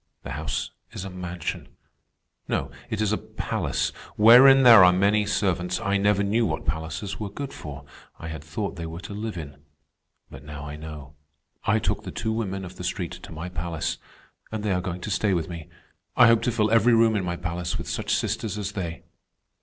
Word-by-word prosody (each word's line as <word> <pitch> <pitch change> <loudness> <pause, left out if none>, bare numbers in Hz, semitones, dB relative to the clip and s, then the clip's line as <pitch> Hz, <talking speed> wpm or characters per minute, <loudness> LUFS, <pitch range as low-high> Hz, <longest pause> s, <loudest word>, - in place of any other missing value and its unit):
The - - -6
house - - -3 0.2
is 95 - -5
a 95 - -6
mansion. 90 -2 -5 0.7
No, 70 0 -1 0.2
it 110 -2 -2
is 105 -1 +1
a - - 0
palace, - - -2 0.3
wherein 130 +5 +8
there 115 -6 +10
are 90 - +8
many 100 +3 +2
servants. 90 -3 0
I 100 +1 +1
never 100 0 +2
knew 110 +4 +2
what 80 -8 -2
palaces 80 +6 -3
were 105 -2 -3
good 140 +7 -6
for. 70 -1 -8 0.3
I 80 - -8
had 80 -2 -7
thought 95 +6 -4
they 85 -1 -4
were 80 +1 -7
to 100 - -8
live 105 -1 -4
in. 70 -4 -7 0.7
But 70 +1 -10
now 75 0 -8
I 75 0 -6
know. 75 -2 -9 0.5
I 110 - +3
took 110 - -1
the - - -7
two 110 - -2
women 95 -4 -3
of 90 +1 -10
the - - -7
street 90 -1 -3
to - - -10
my 80 +2 -6
palace, 85 -2 -3 0.5
and 110 -1 -4
they 105 - 0
are 90 -1 +1
going 90 -1 -5
to 105 - -4
stay 100 -1 +2
with 80 -2 -1
me. 85 -3 -8 0.5
I 125 - +9
hope 115 -1 +5
to 125 - +1
fill 110 -2 +1
every 115 +1 +5
room 115 -1 +4
in 100 - 0
my 85 -1 -2
palace 85 0 -3
with - - -6
such - - -1
sisters 105 -1 -2
as 100 -1 -3
they." 85 -5 -5
95 Hz, 210 wpm, -25 LUFS, 80-105 Hz, 0.7 s, there